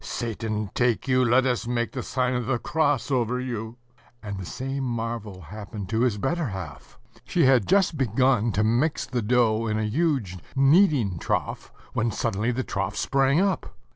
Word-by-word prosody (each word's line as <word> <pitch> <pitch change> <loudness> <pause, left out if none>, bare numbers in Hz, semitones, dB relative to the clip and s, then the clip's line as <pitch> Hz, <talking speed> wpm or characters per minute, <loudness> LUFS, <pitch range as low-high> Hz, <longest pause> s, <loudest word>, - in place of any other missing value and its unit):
"Satan 110 -5 -3
take 120 +1 +1
you, 130 -1 +3
let 125 +2 +4
us 125 -2 0
make 120 -1 -1
the 130 - -4
sign 125 0 -1
of 125 -2 -2
the 135 - +1
cross 145 -2 0
over 125 -1 +1
you!"... 120 -2 -5 0.5
And 100 -2 -5
the 95 - -6
same 135 +5 -4
marvel 115 -5 -4
happened 100 +3 -8
to 110 +1 0
his 120 -4 +2
better 155 +8 -1
half. 90 - -8 0.3
She - - +2
had 130 -6 +4
just 190 -6 +2
begun 125 -1 +2
to 105 - +1
mix 120 +8 +1
the 125 -2 -2
dough 115 0 +2
in 110 0 0
a 110 - 0
huge 115 - 0 0.2
kneading 135 - +4
trough, - - -2 0.2
when 115 +1 +1
suddenly 110 +1 -1
the 130 +2 -2
trough 95 -4 -3
sprang 135 +2 +2
up. 195 0 -1
120 Hz, 175 wpm, -25 LUFS, 110-135 Hz, 0.5 s, let